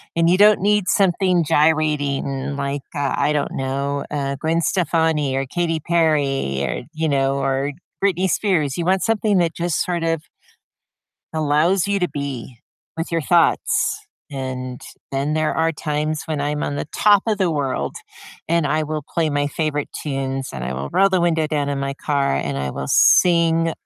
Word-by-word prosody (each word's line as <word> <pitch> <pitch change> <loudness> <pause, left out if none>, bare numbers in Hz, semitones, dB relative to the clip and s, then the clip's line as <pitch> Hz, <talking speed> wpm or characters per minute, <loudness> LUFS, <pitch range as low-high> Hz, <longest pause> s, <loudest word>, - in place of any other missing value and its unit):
and 165 0 +3
you 180 - +4
don't 210 +1 +6
need 205 0 +2
something 185 -2 +2
gyrating 145 -3 +1
like, 140 0 -2
uh, 145 -1 -1
I 145 +1 +2
don't 145 - -1
know, 140 +1 -2
uh, 140 -2 -2
Gwen 165 +1 0
Stefani, 160 -4 +1
or 135 0 -1
Katy 165 +3 -1
Perry, 145 - +1
or, 65 -2 -2
you 160 0 -1
know, 135 -1 +1
or 135 +1 0 0.3
Britney 190 -1 +2
Spears. 165 -9 +1
You 170 - -2
want 190 +1 +2
something 215 -2 +1
that 170 -2 +1
just 175 -2 0
sort 175 -2 -2
of 165 -1 0 1.1
allows 160 +5 +2
you 200 -1 0
to 180 - +1
be 135 -4 -6 0.4
with 165 +1 -4
your 165 - +1
thoughts, 145 - +2 0.3
and 130 -2 -5 0.3
then 140 +2 -1
there 155 0 0
are 165 0 +2
times 150 0 -2
when 155 -3 -2
I'm 150 +1 -1
on 145 - -3
the 145 - -4
top 205 -2 +5
of 215 -2 +1
the 185 -4 +1
world, 135 - -2 0.5
and 170 -2 +2
I 155 +2 +1
will 155 0 -3
play 165 -2 +1
my 145 0 0
favorite 150 -1 -2
tunes, 135 -2 -3
and 65 -2 -5
I 65 - -3
will 70 +2 -4
roll 195 - +4
the 190 -2 +1
window 165 -2 +1
down 150 -2 -1
in 140 -1 -2
my 140 0 -3
car, 140 - 0
and 70 0 -2
I 70 0 -2
will 70 +1 -5
sing 165 -2 +4
150 Hz, 180 wpm, -21 LUFS, 140-170 Hz, 1.1 s, don't